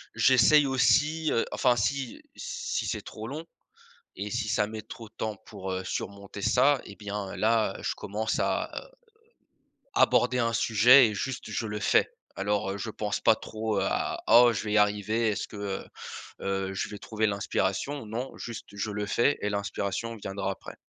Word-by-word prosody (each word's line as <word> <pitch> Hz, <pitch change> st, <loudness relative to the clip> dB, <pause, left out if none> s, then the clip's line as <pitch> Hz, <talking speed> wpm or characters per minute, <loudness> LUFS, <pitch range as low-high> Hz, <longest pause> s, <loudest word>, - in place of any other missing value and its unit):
J'essaye 135 Hz, +3 st, +6 dB
aussi, 150 Hz, +4 st, +3 dB
heu, 115 Hz, -, +2 dB
enfin, 125 Hz, -1 st, +3 dB
si 125 Hz, +3 st, -1 dB
si -, -, -3 dB
c'est -, -, -2 dB
trop 110 Hz, +1 st, -8 dB
long 155 Hz, +6 st, -6 dB, 0.7 s
et 105 Hz, +2 st, -4 dB
si 120 Hz, -2 st, -1 dB
ça 105 Hz, -3 st, +2 dB
met 110 Hz, 0 st, -7 dB
trop 115 Hz, 0 st, -10 dB
de -, -, -40 dB
temps 110 Hz, -1 st, -3 dB
pour, 95 Hz, -3 st, -6 dB
heu, 95 Hz, 0 st, -3 dB
surmonter 100 Hz, +1 st, -5 dB
ça 135 Hz, +6 st, +4 dB
et 100 Hz, -, -11 dB
bien, 105 Hz, -2 st, -5 dB
là, 110 Hz, 0 st, +2 dB
je -, -, -1 dB
commence 110 Hz, +2 st, -2 dB
à, -, -, 0 dB
heu, -, -, -17 dB, 1.1 s
aborder 125 Hz, +1 st, +4 dB
un 115 Hz, -1 st, +1 dB
sujet 120 Hz, +4 st, +6 dB
et 105 Hz, -, -4 dB
juste 130 Hz, +5 st, -4 dB
je 115 Hz, -, -2 dB
le 105 Hz, 0 st, -4 dB
fais. -, -, +3 dB, 0.3 s
Alors, 100 Hz, 0 st, 0 dB
heu, -, -, -4 dB
je 105 Hz, +3 st, -4 dB
pense 105 Hz, -1 st, -3 dB
pas -, -, +5 dB
trop 110 Hz, -1 st, -3 dB
à -, -, -1 dB
«Oh 120 Hz, 0 st, +8 dB
je 105 Hz, -, -3 dB
vais 105 Hz, -, -2 dB
y -, -, +4 dB
arriver. 105 Hz, +2 st, +2 dB
Est-ce 100 Hz, -, -3 dB
que, -, -, -10 dB
heu 100 Hz, -1 st, -4 dB, 0.6 s
heu, 95 Hz, 0 st, -2 dB
je -, -, -2 dB
vais 105 Hz, -, -8 dB
trouver 110 Hz, +1 st, -1 dB
l'inspiration?», 100 Hz, +6 st, -1 dB
non 120 Hz, +5 st, -4 dB
juste 115 Hz, -2 st, -7 dB
je 100 Hz, +1 st, -3 dB
le 105 Hz, 0 st, -2 dB
fais 120 Hz, +7 st, +2 dB
et 105 Hz, -, 0 dB
l'inspiration 100 Hz, +3 st, -3 dB
viendra 95 Hz, -2 st, -3 dB
après. 95 Hz, -, -9 dB
110 Hz, 185 wpm, -28 LUFS, 100-120 Hz, 1.1 s, Oh